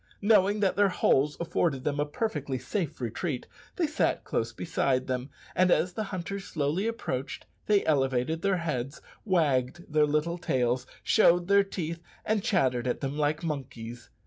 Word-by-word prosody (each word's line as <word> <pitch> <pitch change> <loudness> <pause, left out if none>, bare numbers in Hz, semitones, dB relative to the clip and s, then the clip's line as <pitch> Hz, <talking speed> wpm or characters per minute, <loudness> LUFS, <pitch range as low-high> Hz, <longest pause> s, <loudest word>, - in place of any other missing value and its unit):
Knowing 205 -1 +4
that 195 -2 +2
their 200 -1 +4
holes 145 -5 +2
afforded 160 -5 0
them 145 +1 -1
a 145 - +1
perfectly 145 - -2
safe 155 - -3
retreat, 125 - -3 0.3
they 350 - +1
sat 310 +1 0
close - - -1
beside 130 -1 0
them; 130 +1 -3 0.3
and 185 0 +4
as 180 0 +2
the 215 +3 -3
hunters 195 +1 -5
slowly 155 +7 -1
approached, 140 - -4 0.2
they 205 -2 +3
elevated 135 +1 +1
their 195 -1 +2
heads, 150 -5 -3 0.3
wagged 155 - +1
their 150 0 +3
little 155 +4 0
tails, 125 -3 0 0.2
showed 175 -5 +4
their 200 0 +5
teeth, 170 -4 -5 0.2
and 215 -1 +1
chattered 130 - +1
at 125 - -1
them 135 0 -2
like 150 +2 0
monkeys. 120 -6 -5
155 Hz, 160 wpm, -28 LUFS, 130-185 Hz, 0.3 s, their